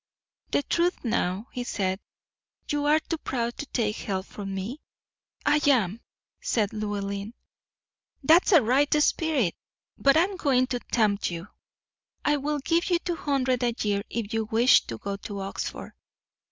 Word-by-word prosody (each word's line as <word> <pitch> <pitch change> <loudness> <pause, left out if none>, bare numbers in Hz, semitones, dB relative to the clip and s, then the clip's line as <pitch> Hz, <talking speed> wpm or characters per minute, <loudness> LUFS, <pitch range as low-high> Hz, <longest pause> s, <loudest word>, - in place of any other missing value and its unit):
"The 285 - +1
truth 345 +4 0
now," 210 -3 0
he 250 - -4
said; 190 -5 -1 0.7
"you 290 0 -1
are 300 +1 +5
too 325 0 -4
proud 235 -4 -2
to 290 - -5
take 215 -6 -1
help 190 -2 -3
from 195 -2 -6
me?" 220 +10 -5 0.6
"I 295 0 +4
am," 225 -5 +2 0.4
said 210 -4 0
Llewellyn. 205 0 -3 0.9
"That's 330 +8 +5
a 325 -8 +7
right 270 +6 +3
spirit; 295 - +2 0.5
but 275 +2 +5
I 325 - +6
am 385 +1 -3
going 265 -8 +3
to 245 - -1
tempt 210 -4 +1
you. 170 +2 -6 0.8
I 295 0 +3
will 295 +2 -1
give 335 +6 0
you 350 - +4
two 345 0 -3
hundred 260 -5 0
a 240 -1 +1
year 205 -1 +1
if 225 -2 -4
you 225 -1 0
wish 230 +4 +4
to 115 - -5
go 200 - -4
to 200 0 -7
Oxford." 195 0 -5
240 Hz, 160 wpm, -26 LUFS, 200-290 Hz, 0.9 s, a